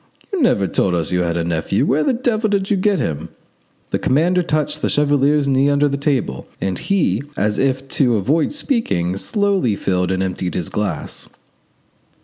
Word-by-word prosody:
You 380 - 0
never 105 - +3
told 90 0 +1
us 80 -3 -1
you 90 0 +1
had 85 -1 -1
a 85 - 0
nephew. 85 +4 0
Where 150 +3 +2
the - - +2
devil 230 -3 0
did 200 -1 0
you - - +4
get 195 +1 +1
him?" 80 - -3 0.6
The - - 0
commander 175 +7 +2
touched 155 -3 -1
the - - 0
chevalier's 145 0 +2
knee 135 +1 +3
under 145 +1 +3
the 140 - -1
table, 140 - -1
and 95 -2 -2
he, 155 - +1 0.2
as 105 0 0
if 135 0 0
to 125 -5 +4
avoid 145 - +1
speaking, 100 - -1
slowly 195 - 0
filled 90 -2 -1
and 95 0 0
emptied 90 -1 -3
his 85 - -3
glass. 105 -1 -4
135 Hz, 180 wpm, -19 LUFS, -, 0.6 s, you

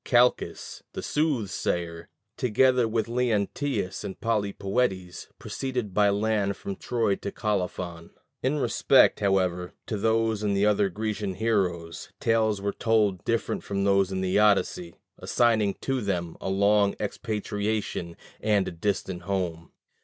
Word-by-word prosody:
Calchas, 125 0 +1
the - - -5
soothsayer, 90 - -1 0.3
together 125 +1 +3
with 110 -1 0
Leonteus 115 -2 -1
and 95 - -6
Polypoetes, 100 -3 -1
proceeded 125 -7 -4
by 105 +1 +4
land 100 -1 0
from 100 - -5
Troy 115 -3 0
to 100 - -5
Colophon. 90 -5 -3 0.3
In 135 +3 +1
respect, 145 - +4
however, 90 -3 0
to 105 - -3
these 110 0 +1
and 100 -2 0
other 105 -1 +3
Grecian 105 0 -3
heroes, 90 -7 -1
tales 110 -2 +2
were 100 +1 -2
told 105 -5 +1
different 115 0 -1
from 100 0 -2
those 100 -1 +3
in 95 0 -2
the 95 +2 +2
Odyssey, 95 -4 +2 0.2
assigning 110 -5 +2
to 135 -1 -1
them 90 -5 -2
a - - -3
long 100 +1 +3
expatriation 105 -4 -3 0.2
and 105 -3 +2
a - - -3
distant 90 0 -2
home. 85 -3 -3
100 Hz, 130 wpm, -27 LUFS, 95-110 Hz, 0.3 s, by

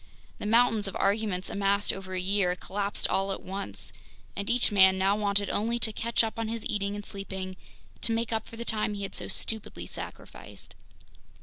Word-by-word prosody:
The - - -3
mountains 225 -2 +4
of 195 - -5
arguments 200 -2 +1
amassed 200 0 +2
over 190 -1 -6
a - - 0
year 185 -1 +2
collapsed 200 +2 -1
all 195 0 +1
at 195 - -4
once, 185 - -5 0.4
and 200 +2 -3
each 240 -1 +3
man 190 -2 +7
now 195 +2 +3
wanted 200 -1 +1
only 230 +3 +1
to 225 -2 0
catch 230 +2 +2
up 225 0 -3
on 225 - -1
his 230 0 -4
eating 200 0 -1
and 205 0 -6
sleeping, 190 -1 -5 0.5
to 230 - +1
make 225 0 0
up 220 -1 -1
for - - -10
the 235 - -5
time 215 -2 +1
he 200 - -4
had 195 - -4
so - - -3
stupidly 220 -2 -3
sacrificed. - - -9
200 Hz, 195 wpm, -29 LUFS, 195-220 Hz, 0.5 s, man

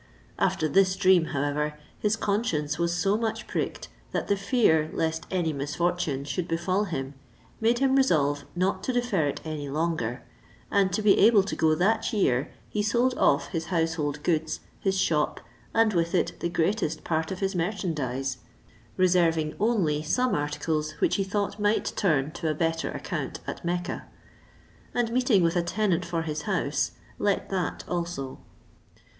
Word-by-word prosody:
After 155 - +1
this 185 +4 +3
dream, 185 -3 +4
however, 150 0 -1 0.2
his 210 0 +2
conscience 170 -9 -1
was 170 0 +1
so 195 +4 +1
much 225 0 -2
pricked, - - -3 0.3
that - - -2
the 200 - +4
fear 195 - +2
lest 160 0 -1
any 175 -4 0
misfortune 150 0 -1
should 150 +5 -3
befall 185 +5 0
him 135 -7 -4 0.5
made 230 +2 +3
him 270 +1 +3
resolve 145 - +2
not 185 +1 0
to 255 - 0
defer 240 -11 +1
it 140 - -3
any 150 -3 -4
longer; 150 -5 -1 0.5
and 195 -2 +3
to 215 +2 0
be 205 -1 +5
able 210 -1 +6
to 195 - -4
go 160 -1 +3
that 220 +8 +1
year, 140 - +1 0.2
he 210 - -1
sold 240 +4 +2
off - - +3
his 165 -3 -3
household 160 -4 -1
goods, 160 -2 0 0.2
his 195 -1 0
shop, 150 -5 +1 0.3
and 225 -1 +3
with 170 0 +1
it - - 0
the 170 - -1
greatest 170 -1 0
part 160 -1 -1
of 190 - -3
his 195 +1 -1
merchandize, 150 - -2 0.6
reserving 170 -4 +3
only 195 -9 +2
some 250 +11 +1
articles, 150 +1 -1
which - - +1
he 195 - +1
thought 200 +2 -2
might 205 +1 +1
turn 155 -7 +1
to 160 0 -3
a 155 - 0
better 165 +1 0
account - - -4
at - - -6
Mecca; 175 +2 -2 0.9
and 240 -2 +1
meeting 245 -6 +3
with 165 +1 +2
a 175 - +3
tenant 180 0 0
for 165 -2 -2
his 155 -1 -3
house, - - 0 0.3
let - - 0
that 85 0 -2
also. 170 -6 -3
170 Hz, 160 wpm, -27 LUFS, 155-200 Hz, 0.9 s, able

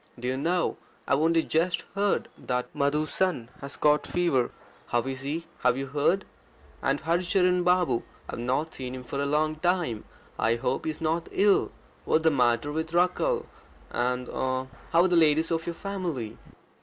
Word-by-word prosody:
Do 125 - -4
you 130 - 0
know, 170 +6 0 0.3
I've 140 - +3
only 165 +1 +3
just 170 +3 0
heard 200 0 +1
that 125 0 -3
Madhu's 150 +1 +1
son 175 -11 0
has 140 +1 -7
got 150 0 +3
fever. 170 -9 +1 0.4
How 120 -1 +1
is 135 0 -4
he? 155 +5 -3
Have 125 0 +2
you 135 - -2
heard? 150 +8 +1 0.6
And - - +1
Hari 170 +2 +1
Charan 180 -1 +2
Babu 180 -9 +3 0.3
I've - - -6
not 130 +7 -1
seen 130 -1 -5
him 130 - -7
for 140 +3 -4
a 140 - 0
long 155 +2 +1
time 175 -10 0 0.3
I 115 +2 +3
hope 125 +3 -2
he - - 0
is 155 - -5
not 165 +1 0
ill. 200 0 +3 0.3
What's 160 - +2
the 160 - +5
matter 125 0 +2
with 160 +2 -3
Rakkhal? 450 - +2 0.5
And, 125 +1 -1
er - - -8 0.3
er, - - -14 0.2
how 170 +1 +5
are - - +4
the 180 - +2
ladies 160 0 +4
of 165 0 -1
your 170 - -2
family?" 170 - -4
155 Hz, 185 wpm, -27 LUFS, 130-175 Hz, 0.6 s, the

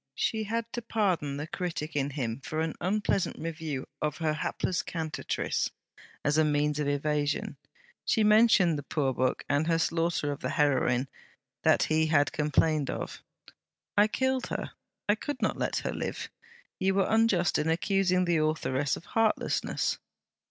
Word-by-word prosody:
She 220 -1 0
had 230 +2 -1
to 240 - -3
pardon 185 -11 0
the 145 - -3
critic 160 -2 -4
in 140 -1 +1
him 130 -4 -3
for 155 - -3
an 160 0 0
unpleasant 195 +1 0
review 160 -4 -4 0.2
of 150 -1 -1
her 160 -2 0
hapless 165 +3 -1
CANTATRICE; 160 -3 -2 0.3
and - - -19 0.2
as 145 +2 +3
a - - +5
means 150 0 +1
of 150 - 0
evasion, 145 +1 0 0.5
she 220 - +2
mentioned 210 -7 +5
the - - -4
poor 140 -2 -1
book 130 +1 0
and 145 +3 +1
her 165 -1 +3
slaughter 165 -2 0
of 140 - -5
the - - -3
heroine, 135 -4 +2 0.5
that - - +4
he 160 0 +2
had 145 -2 +3
complained 150 -1 +1
of. - - -5 0.7
'I 205 +1 +6
killed 260 +3 0
her; - - -4 0.4
I 205 - +5
could 290 +6 -4
not - - 0
let - - -1
her - - -1
live. - - -4 0.5
You 190 0 +2
were 195 -1 +3
unjust 220 -6 +3
in 150 +2 0
accusing 185 +2 +2
the 170 -1 +2
authoress 150 -3 0
of - - -12
heartlessness.' 225 -1 0
160 Hz, 165 wpm, -29 LUFS, 145-195 Hz, 0.7 s, I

